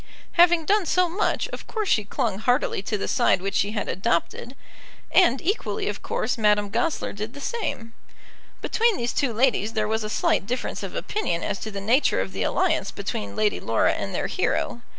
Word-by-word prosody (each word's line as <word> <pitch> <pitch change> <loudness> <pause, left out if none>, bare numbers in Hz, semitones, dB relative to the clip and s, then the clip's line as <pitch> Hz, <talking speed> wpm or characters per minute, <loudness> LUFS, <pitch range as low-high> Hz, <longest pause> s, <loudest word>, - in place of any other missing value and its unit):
Having 345 -2 +5
done 400 0 +2
so 365 +2 +3
much, 365 +5 0
of - - -8
course 435 -3 -3
she 215 - +3
clung 200 -1 -2
heartily 245 -2 +1
to 210 +2 -2
the - - -3
side - - +3
which 195 +1 -3
she 200 +2 +1
had 210 - -2
adopted; 190 +7 -1 0.6
and, 270 -9 +5
equally 330 - -1
of 205 - -3
course, 240 +2 -2
Madame 210 -1 +2
Goesler 330 +7 -1
did 215 +5 -6
the - - -8
same. 275 - -4 0.7
Between 460 -3 +2
these 240 0 -2
two 275 -4 +1
ladies 225 -2 +1
there 215 -2 0
was 220 0 -1
a 215 - -4
slight 200 - +1
difference 250 +3 -3
of - - -6
opinion 425 - -2
as 195 - -2
to 220 - -5
the 200 -2 -5
nature 235 - +2
of 95 0 -2
the - - -5
alliance - - +1
between 100 -1 -5
Lady 210 -1 +1
Laura - - +2
and - - -4
their - - -1
hero. 235 - -1
225 Hz, 195 wpm, -24 LUFS, 205-330 Hz, 0.7 s, Having